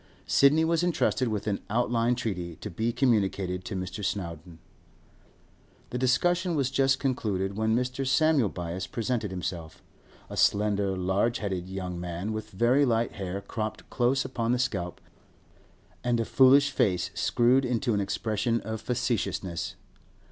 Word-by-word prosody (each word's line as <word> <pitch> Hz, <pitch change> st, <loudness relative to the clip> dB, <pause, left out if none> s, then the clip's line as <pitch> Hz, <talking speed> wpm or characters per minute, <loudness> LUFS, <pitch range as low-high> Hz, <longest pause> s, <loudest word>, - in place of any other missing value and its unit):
Sidney 150 Hz, +4 st, +4 dB
was 165 Hz, 0 st, +2 dB
entrusted 160 Hz, -7 st, +1 dB
with 105 Hz, -3 st, -2 dB
an 105 Hz, -2 st, -1 dB
outline 120 Hz, +1 st, +1 dB
treaty, 90 Hz, -8 st, -4 dB
to -, -, -8 dB
be 110 Hz, +7 st, -1 dB
communicated 100 Hz, -7 st, +1 dB
to 105 Hz, -, -5 dB
Mr. 95 Hz, +3 st, -5 dB
Snowdon. 85 Hz, -4 st, -4 dB, 1.3 s
This 125 Hz, -, -2 dB
discussion 170 Hz, +8 st, +2 dB
was 135 Hz, -3 st, 0 dB
just 135 Hz, 0 st, +3 dB
concluded 100 Hz, -8 st, -1 dB
when 110 Hz, +1 st, +1 dB
Mr. 125 Hz, +2 st, -1 dB
Samuel 135 Hz, -3 st, +3 dB
Byass 90 Hz, +1 st, -5 dB
presented 115 Hz, -2 st, -2 dB
himself—a 85 Hz, -3 st, -8 dB
slender, 100 Hz, -2 st, +2 dB
large 95 Hz, +6 st, +1 dB
headed 95 Hz, -4 st, -4 dB
young 90 Hz, -2 st, -4 dB
man, 90 Hz, +4 st, -4 dB
with 110 Hz, 0 st, -5 dB
very 120 Hz, +8 st, +3 dB
light 115 Hz, -3 st, +1 dB
hair 95 Hz, -1 st, -5 dB
cropped 110 Hz, +1 st, -5 dB
close 130 Hz, +2 st, +1 dB
upon 120 Hz, -3 st, -1 dB
the -, -, +2 dB
scalp, 95 Hz, -9 st, -2 dB, 1.0 s
and 120 Hz, -1 st, +1 dB
a 115 Hz, -, 0 dB
foolish 140 Hz, +4 st, +5 dB
face 90 Hz, -9 st, +1 dB
screwed 125 Hz, +3 st, +3 dB
into 120 Hz, -1 st, 0 dB
an 100 Hz, -, +1 dB
expression 110 Hz, +3 st, -1 dB
of 110 Hz, +1 st, -5 dB
facetiousness. 120 Hz, -8 st, -2 dB
110 Hz, 140 wpm, -28 LUFS, 95-125 Hz, 1.3 s, foolish